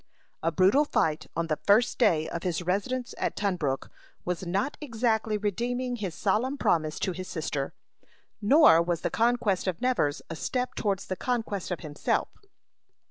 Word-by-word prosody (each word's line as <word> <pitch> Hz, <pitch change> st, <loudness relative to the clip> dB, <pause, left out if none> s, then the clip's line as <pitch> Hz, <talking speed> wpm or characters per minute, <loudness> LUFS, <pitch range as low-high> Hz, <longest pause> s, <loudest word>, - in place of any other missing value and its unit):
A 165 Hz, -, +1 dB
brutal 190 Hz, -, +4 dB
fight 155 Hz, -, 0 dB
on 170 Hz, +1 st, 0 dB
the 155 Hz, -2 st, -1 dB
first 215 Hz, +4 st, +4 dB
day 160 Hz, -10 st, +3 dB
of 170 Hz, -, -4 dB
his 175 Hz, -1 st, -2 dB
residence 205 Hz, +8 st, -1 dB
at -, -, -1 dB
Tunbrook 175 Hz, -10 st, -1 dB, 0.3 s
was 180 Hz, 0 st, -3 dB
not 200 Hz, +11 st, -1 dB
exactly 225 Hz, -5 st, 0 dB
redeeming 245 Hz, +5 st, -2 dB
his 190 Hz, -7 st, -4 dB
solemn 235 Hz, +8 st, 0 dB
promise 155 Hz, -, +1 dB
to 190 Hz, -, 0 dB
his 185 Hz, +1 st, -6 dB
sister; 150 Hz, -4 st, -3 dB, 0.7 s
nor 205 Hz, -, +7 dB
was 170 Hz, -1 st, -1 dB
the -, -, -1 dB
conquest 230 Hz, -5 st, +1 dB
of 180 Hz, -3 st, -1 dB
Nevers 245 Hz, -, 0 dB
a 165 Hz, -, -6 dB
step 250 Hz, +9 st, -2 dB
towards 200 Hz, -2 st, -1 dB
the 185 Hz, -, -3 dB
conquest 225 Hz, -4 st, -2 dB
of 180 Hz, -, -3 dB
himself. 150 Hz, -2 st, -1 dB
195 Hz, 160 wpm, -28 LUFS, 170-240 Hz, 0.7 s, nor